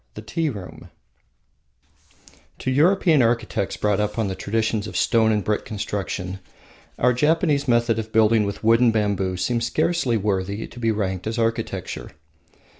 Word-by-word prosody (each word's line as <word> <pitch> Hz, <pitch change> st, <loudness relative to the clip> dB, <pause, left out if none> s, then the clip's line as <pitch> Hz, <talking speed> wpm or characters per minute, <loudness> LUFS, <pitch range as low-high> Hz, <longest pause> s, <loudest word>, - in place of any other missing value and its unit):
The 105 Hz, -, -8 dB
Tea 155 Hz, +9 st, -1 dB
Room 100 Hz, -8 st, -9 dB, 1.7 s
To 130 Hz, -, -2 dB
European 160 Hz, +1 st, +4 dB
architects 115 Hz, -4 st, 0 dB
brought 105 Hz, -1 st, +1 dB
up 105 Hz, +1 st, -2 dB
on 110 Hz, -3 st, 0 dB
the -, -, -2 dB
traditions 110 Hz, +2 st, -1 dB
of -, -, -5 dB
stone 110 Hz, -2 st, +3 dB
and 105 Hz, -2 st, 0 dB
brick 105 Hz, +2 st, -1 dB
construction, 95 Hz, -3 st, -4 dB, 0.6 s
our 125 Hz, +1 st, +3 dB
Japanese 150 Hz, +1 st, +1 dB
method 120 Hz, -2 st, +2 dB
of 110 Hz, 0 st, -6 dB
building 110 Hz, 0 st, +4 dB
with 100 Hz, +1 st, -5 dB
wood 115 Hz, +1 st, +5 dB
and 120 Hz, -2 st, +5 dB
bamboo 100 Hz, -4 st, 0 dB
seems 115 Hz, +6 st, 0 dB
scarcely 155 Hz, -5 st, +1 dB
worthy 100 Hz, 0 st, -2 dB
to -, -, -12 dB
be 115 Hz, -1 st, 0 dB
ranked 95 Hz, -3 st, -2 dB
as 110 Hz, +2 st, -3 dB
architecture. 115 Hz, 0 st, -2 dB
110 Hz, 155 wpm, -23 LUFS, 100-120 Hz, 1.7 s, wood